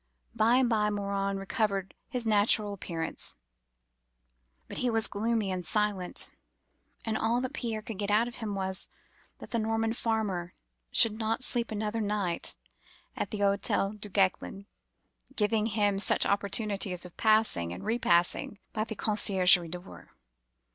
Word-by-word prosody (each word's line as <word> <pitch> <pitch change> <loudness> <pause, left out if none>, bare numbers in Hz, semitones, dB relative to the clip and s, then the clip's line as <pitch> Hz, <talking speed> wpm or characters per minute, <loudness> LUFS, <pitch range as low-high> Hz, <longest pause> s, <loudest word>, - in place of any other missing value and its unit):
By 230 +1 +3
and 255 -1 +4
by 215 -3 +2
Morin 200 -1 -1
recovered 195 -1 -1 0.2
his 245 -2 -2
natural 210 -1 +3
appearance; 165 -4 -5 1.3
but - - -6
he 250 - +1
was 225 -1 +2
gloomy 215 -1 0
and 185 -1 -3
silent; 205 -2 0 0.7
and 220 -1 -1
all 225 +2 +1
that 255 +2 -4
Pierre 225 -6 -3
could 215 -3 -7
get 205 -1 -1
out 215 +3 +3
of 240 - -8
him 215 -3 -4
was, 190 -1 -3 0.5
that - - -11
the 235 - +1
Norman 225 0 0
farmer 210 -7 -2 0.4
should 220 -1 +4
not 225 +3 0
sleep 235 -2 0
another 215 +1 -2
night 200 -5 -1 0.6
at 200 - -3
the 210 - -4
Hotel 200 0 +1
Duguesclin, 200 -1 -1 0.7
giving 215 0 +1
him 205 -3 +1
such - - +3
opportunities 200 -2 +1
of 180 - -12
passing 215 - +2
and 90 - -7
repassing 205 -4 +2 0.2
by 215 - 0
the 220 - -5
conciergerie 185 -5 +4
door. 180 +2 -10
210 Hz, 140 wpm, -29 LUFS, 195-225 Hz, 1.3 s, and